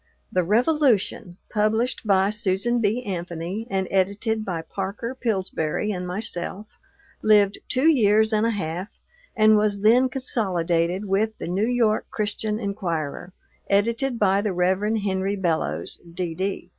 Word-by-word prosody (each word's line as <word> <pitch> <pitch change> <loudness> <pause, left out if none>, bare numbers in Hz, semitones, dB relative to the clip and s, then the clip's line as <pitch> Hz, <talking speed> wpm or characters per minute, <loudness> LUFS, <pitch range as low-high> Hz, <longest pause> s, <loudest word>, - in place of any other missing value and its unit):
The 185 - +2
Revolution, 230 - +1
published 220 +3 0
by 195 0 +3
Susan 210 +3 0
B. 225 +4 0
Anthony 180 +2 -4
and 190 -2 -1
edited 205 +4 0
by 175 -5 -3
Parker 200 +7 -4
Pillsbury 210 -6 -1
and 180 -2 -4
myself, 190 +1 -4 0.6
lived 205 -2 +4
two 260 +4 +2
years 220 -6 +4
and 215 0 +2
a 230 - +2
half 185 -3 -3 0.5
and 215 0 +5
was 210 -1 +1
then 245 +5 +5
consolidated 185 -8 -1
with 210 +3 0
the - - -6
New 195 +6 0
York 235 -3 +1
Christian 210 0 -2
Enquirer, 175 -6 -3 0.4
edited 230 +5 +1
by 200 -2 +3
the 205 -2 -1
Rev. 180 +1 +2 0.2
Henry 195 0 -1
Bellows, 160 - -2
D.D. 180 +3 -3
200 Hz, 130 wpm, -24 LUFS, 185-220 Hz, 0.6 s, and